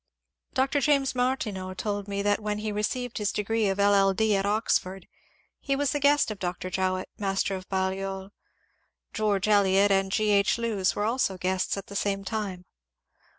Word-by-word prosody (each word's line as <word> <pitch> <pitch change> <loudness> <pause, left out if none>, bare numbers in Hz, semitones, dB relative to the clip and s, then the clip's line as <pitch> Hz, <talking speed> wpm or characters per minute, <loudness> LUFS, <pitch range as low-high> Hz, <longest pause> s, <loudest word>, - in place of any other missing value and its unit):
Dr. 270 +2 +1
James 275 -1 +2
Martineau 215 -7 -2
told 205 +1 -3
me 200 0 -2
that 205 0 +2
when 210 -1 -2
he 215 0 -3
received 230 +4 -2
his 210 -1 0
degree 215 +1 0
of 195 - -1
LL. 200 -1 +4
D. 215 +1 +2
at 195 0 0
Oxford, 195 -3 0 0.5
he 275 - -1
was 280 0 0
the 290 - -1
guest 285 -4 +3
of 210 - -7
Dr. 180 0 -4
Jowett, 185 0 -1
master 195 -1 0
of 185 -1 -9
Balliol. 190 0 -2
*^ 195 - -16 0.8
George 210 -2 0
Eliot" 200 -1 +4
and 195 0 +2
G. 215 +1 +1
H. 200 +1 +3
Lewes 220 -5 0
were 205 - -1
also 225 -4 0
guests 185 +2 -1
at 195 - -6
the 200 - -11
same 195 -1 -1
time. 195 -3 -4
200 Hz, 180 wpm, -27 LUFS, 190-220 Hz, 0.8 s, LL